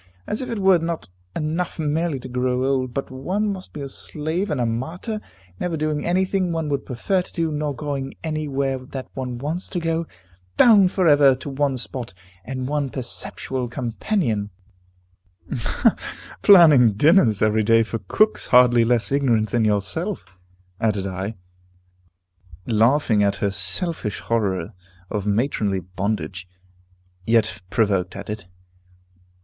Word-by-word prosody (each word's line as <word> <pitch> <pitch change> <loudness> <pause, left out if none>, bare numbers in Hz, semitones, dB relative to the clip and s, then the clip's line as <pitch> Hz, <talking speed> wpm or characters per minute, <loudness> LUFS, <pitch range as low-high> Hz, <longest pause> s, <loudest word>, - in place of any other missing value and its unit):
As 215 - -3
if 255 - -5
it 230 - -3
were 190 -3 +4
not 165 - -4 0.3
enough 165 +2 -2
merely 155 -1 -1
to - - -7
grow 125 +1 0
old, 130 -2 0
but 135 +2 -4
one 190 +11 -1
must 185 -1 -9
be 150 - -7
a 140 - -4
slave 160 +7 -3
and 150 -4 -1
a 120 - +1
martyr, 165 - -3 0.4
never 170 -2 -2
doing 150 -1 -1
any 185 +2 +2
thing 185 -2 0
one 160 -2 -2
would 140 -1 -2
prefer 180 +10 0
to - - -11
do, 165 -2 -1
nor 150 -1 -2
going 140 -1 -4
anywhere 140 -4 -2
that 130 +1 -8
one 125 -2 -4
wants 155 +8 -3
to 180 - -2
go, 165 0 -1 0.5
bound 205 -6 +6
for 185 -4 +1
ever 145 -3 +6
to 135 +2 -7
one 135 -1 0
spot, 125 -3 -6 0.3
and 130 +1 -4
one 145 -1 -1
perpetual 130 0 -3
companion 115 - -2 1.0
" 120 - -2
"Planning 150 - +7
dinners 125 - +4
every 110 0 +3
day 115 +1 +4
for 115 0 -4
cooks 210 - +1
hardly 125 -1 +6
less 115 +1 +1
ignorant 120 -6 +2
than 120 -2 +2
yourself," 105 - -1 0.5
added 105 -3 0
I, 95 +3 -4 1.3
laughing 115 0 +3
at 100 0 +2
her 100 0 -1
selfish 100 - 0
horror 100 -4 -1 0.4
of 105 -2 -2
matronly 105 -3 0
bondage, 95 -1 -4 0.8
yet 115 -2 +2
provoked 95 -3 +1
at 100 +1 -6
it. 105 -3 -7
130 Hz, 145 wpm, -22 LUFS, 110-160 Hz, 1.3 s, Planning